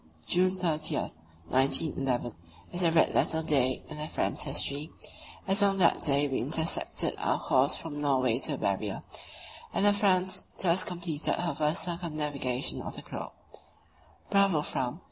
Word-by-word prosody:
June 185 Hz, +1 st, +2 dB
30, 160 Hz, -4 st, 0 dB, 0.5 s
1911, 135 Hz, -3 st, +1 dB, 0.4 s
is 175 Hz, -, -3 dB
a 165 Hz, -, +4 dB
red 160 Hz, -1 st, +3 dB
letter 160 Hz, 0 st, +1 dB
day 130 Hz, -5 st, +2 dB
in 155 Hz, -, -7 dB
the 150 Hz, 0 st, -2 dB
Fram's -, -, -2 dB
history, 145 Hz, +1 st, +1 dB, 0.6 s
as 195 Hz, +2 st, +4 dB
on 200 Hz, -1 st, +3 dB
that 175 Hz, -3 st, +3 dB
day 145 Hz, -1 st, +2 dB
we 135 Hz, -, -1 dB
intersected 160 Hz, +7 st, 0 dB
our -, -, 0 dB
course 135 Hz, +3 st, +2 dB
from 145 Hz, -3 st, -7 dB
Norway 130 Hz, -4 st, +1 dB
to 150 Hz, -, 0 dB
the -, -, -3 dB
Barrier, 100 Hz, -1 st, -2 dB, 0.7 s
and 200 Hz, -, +1 dB
the 205 Hz, -, +6 dB
Franz 190 Hz, -2 st, +2 dB
thus 180 Hz, 0 st, +3 dB
completed 170 Hz, -4 st, 0 dB
her 175 Hz, -1 st, -2 dB
first 150 Hz, +1 st, 0 dB
circumnavigation 150 Hz, -7 st, -2 dB
of -, -, -7 dB
the -, -, -9 dB
globe. -, -, -7 dB, 1.0 s
Bravo, 195 Hz, -6 st, +3 dB
Fram! 130 Hz, +4 st, -3 dB
155 Hz, 150 wpm, -29 LUFS, 135-175 Hz, 1.0 s, the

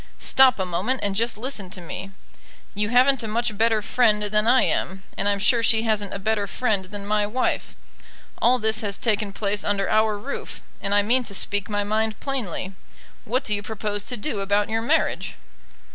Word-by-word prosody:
Stop 265 Hz, -2 st, +4 dB
a 190 Hz, -, -1 dB
moment, 190 Hz, +9 st, -1 dB
and 200 Hz, -1 st, -1 dB
just 230 Hz, +1 st, 0 dB
listen 220 Hz, -5 st, -3 dB
to 185 Hz, -, -8 dB
me. 180 Hz, +3 st, -7 dB, 0.6 s
You 210 Hz, +1 st, -1 dB
haven't 255 Hz, +2 st, +4 dB
a 225 Hz, -, -4 dB
much 225 Hz, 0 st, -1 dB
better 220 Hz, 0 st, +1 dB
friend 210 Hz, -2 st, +2 dB
than 210 Hz, +1 st, +2 dB
I 255 Hz, +2 st, +5 dB
am, 190 Hz, +1 st, -1 dB
and 200 Hz, -, 0 dB
I'm 200 Hz, -, +1 dB
sure 230 Hz, +4 st, +3 dB
she 225 Hz, -1 st, +4 dB
hasn't 210 Hz, -3 st, 0 dB
a -, -, -4 dB
better 205 Hz, 0 st, -1 dB
friend 205 Hz, -4 st, -1 dB
than 200 Hz, +1 st, -7 dB
my 210 Hz, 0 st, +1 dB
wife. 250 Hz, +5 st, -2 dB, 0.7 s
All 250 Hz, +2 st, +4 dB
this 220 Hz, -1 st, +2 dB
has 200 Hz, -2 st, -1 dB
taken 210 Hz, -3 st, 0 dB
place 205 Hz, 0 st, -1 dB
under 200 Hz, -1 st, 0 dB
our 215 Hz, -1 st, +2 dB
roof, 265 Hz, +7 st, -6 dB, 0.2 s
and 200 Hz, +1 st, 0 dB
I 205 Hz, -, +4 dB
mean 250 Hz, +5 st, +3 dB
to 200 Hz, -, -5 dB
speak 205 Hz, +2 st, 0 dB
my 205 Hz, -1 st, -1 dB
mind 215 Hz, +1 st, -1 dB
plainly. 215 Hz, -, -3 dB, 0.5 s
What 255 Hz, +5 st, -1 dB
do 215 Hz, -, 0 dB
you 205 Hz, -, -1 dB
propose 205 Hz, -1 st, -3 dB
to 245 Hz, -, -2 dB
do 210 Hz, -1 st, -3 dB
about 200 Hz, +1 st, 0 dB
your 225 Hz, 0 st, 0 dB
marriage?" 310 Hz, +8 st, 0 dB
210 Hz, 200 wpm, -23 LUFS, 200-230 Hz, 0.7 s, I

